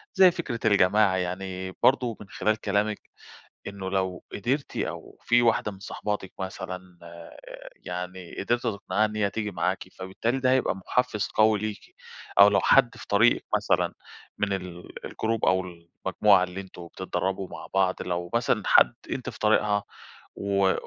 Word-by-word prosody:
زي 185 -2 +7
فكرة 140 -9 -4
الجماعة 100 -1 +4
يعني 95 +1 -4
برضو 125 -4 +3
من 100 - -11
خلال 105 +3 0
كلامِك 105 +1 0 0.7
إنّه 100 -1 -5
لو 95 -2 -2
قدرتِ 130 +8 -2
أو - - -5
في 120 0 +4
واحدة 115 -2 +2
من 95 - -12
صاحباتِك 100 -1 -4
مثلًا 90 -1 -7
آآ، 85 0 -12 0.4
يعني 90 0 -7
قدرتِ 120 +4 0
تِقنعيها 110 -1 0
إن 105 0 -4
هي 100 -2 +1
تيجي 105 +1 -3
معاكِ، 95 0 -1
فبالتالي 115 +7 -2
ده 130 -1 +2
هيبقى 130 -5 +2
محفز 105 +3 -1
قوي 110 -1 +4
ليكِ. 110 0 -6 0.4
أو 100 +1 +10
لو 100 - +3
حد 130 -3 +4
في - - -11
طريقِك 110 +4 +3
مثلًا - - +1 0.4
من 100 -1 0
ال 90 -2 -7
الجروب 115 0 -1
أو 95 0 +3
المجموعة 90 +2 +1
اللي 90 +1 -5
أنتم 90 -2 -11
بتتدربوا 95 +2 -3
مع - - -9
بعض 95 -1 +2
لو 90 -1 -3
مثلًا - - +1
حد 60 - +6 0.2
أنتِ - - -3
في - - -14
طريقها 105 -1 +2 0.5
و 100 -1 +2
100 Hz, 155 wpm, -26 LUFS, 95-110 Hz, 0.7 s, أو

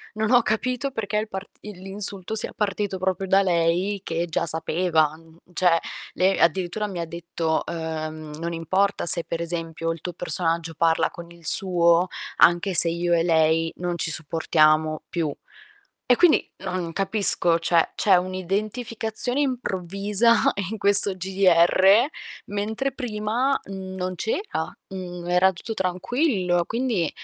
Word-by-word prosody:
non 220 +2 -1
ho 245 -1 +6
capito 255 +5 -2
perché 210 -3 -4
il 215 0 -2
part 190 +1 -7
i 210 - -8
l'insulto 195 +2 -2
sia - - -3
partito 200 -2 -2
proprio 190 +1 -2
da 195 +1 +4
lei 180 +3 0
che 170 +1 -2
già 165 +1 -1
sapeva, 160 -1 +1
uhm, 165 0 -19 0.2
cioè, 170 -2 +3 0.3
lei 190 +1 +2
addirittura 185 +5 +1
mi 175 -4 -5
detto: 165 -1 -3
"Uhm, 155 -2 -5
non 170 +1 -3
importa 190 +4 0
se 170 +1 +5
per 170 - -4
esempio 165 -1 -4
il 165 - -12
tuo 180 - -5
personaggio 165 -1 -2
parla 165 0 +2
con 170 0 -11
il 170 -2 -17
suo 175 -1 +4 0.3
anche 175 +3 +4
se 170 -1 +6
io 170 +1 -1
e 165 -1 +2
lei 160 -1 +2
non 175 -1 -3
ci 165 - -1
sopportiamo 155 -1 +1
più". 160 -5 -2 0.8
E 245 - +5
quindi 345 -3 +4 0.2
non 180 -2 -3
capisco, 195 -4 +3
cioè, 165 0 +1
c'è 195 -3 +4
un'identificazione 215 +7 -3
improvvisa 210 -2 +1 0.3
in 220 - -4
questo 200 -1 +5
GDR, 190 +3 +4 0.4
mentre 220 +7 -2
prima, 240 +2 -1
mhmm, 190 -1 -8
non 185 0 -4
c'era, 220 - -3 0.2
mhmm, 180 -2 -7
era 185 +2 +3
tutto 220 +5 -6
tranquillo. 185 - 0
Quindi, 230 - -1
185 Hz, 145 wpm, -23 LUFS, 170-205 Hz, 0.8 s, ho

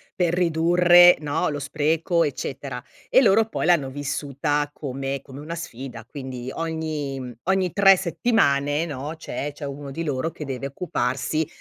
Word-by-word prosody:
per 175 -2 +1
ridurre, 175 +1 +6
no, 150 +1 -1
lo 145 -1 -3
spreco 160 +4 +1
eccetera 135 -3 -4 0.3
e 260 - +6
loro 220 -1 +5
poi - - -3
l'hanno 160 -7 +3
vissuta 145 +1 -2
come 135 -1 -4
come 135 0 -11
una 155 +3 -6
sfida, 130 -7 -7
quindi 130 -1 -7
ogni 155 -5 -4
ogni 190 -1 +1
3 195 -1 +7
settimane, 155 -7 +1
no, 145 +1 -5
c'è 145 -2 -5
c'è 145 - -7
uno 140 0 -6
di 165 +5 -4
loro 145 +1 -2
che 150 - -8
deve 135 -1 -4
occuparsi 140 0 -2
145 Hz, 150 wpm, -24 LUFS, 135-170 Hz, 0.3 s, 3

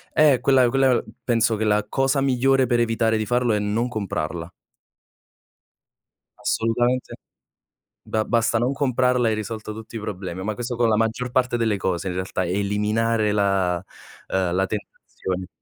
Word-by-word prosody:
Eh, 150 -4 +5
quella 130 -3 +4
quella 130 -1 +3 0.2
penso 115 -2 +2
che 110 - -2
la 105 0 +2
cosa 135 +1 +1
migliore 135 0 +3
per 120 -1 +1
evitare 115 -1 +1
di 110 - -1
farlo 120 -1 +1
è 105 - +1
non 105 +4 0
comprarla. 85 -6 -4 1.9
Assolutamente. 120 +3 0 0.9
Ba 110 0 -1
basta 115 -1 +1
non 125 +3 +1
comprarla, 125 -3 +1
e - - +2
hai - - +1
risolto 110 0 -5
tutti 110 +1 -9
i - - -4
problemi, 95 -3 -5
ma 105 +2 -2
questo 120 +2 -4
con 120 -1 +2
la 110 - +3
maggior 115 +3 -1
parte 125 -2 +1
delle 110 -3 +1
cose, 95 0 -2
in 90 - -3
realtà, 95 0 -2
eliminare 105 +3 0
la 95 -3 +1 0.5
uhm, 90 -2 0
la 95 +1 +1
tentazione. 95 -3 -5
110 Hz, 160 wpm, -23 LUFS, 100-125 Hz, 1.9 s, Eh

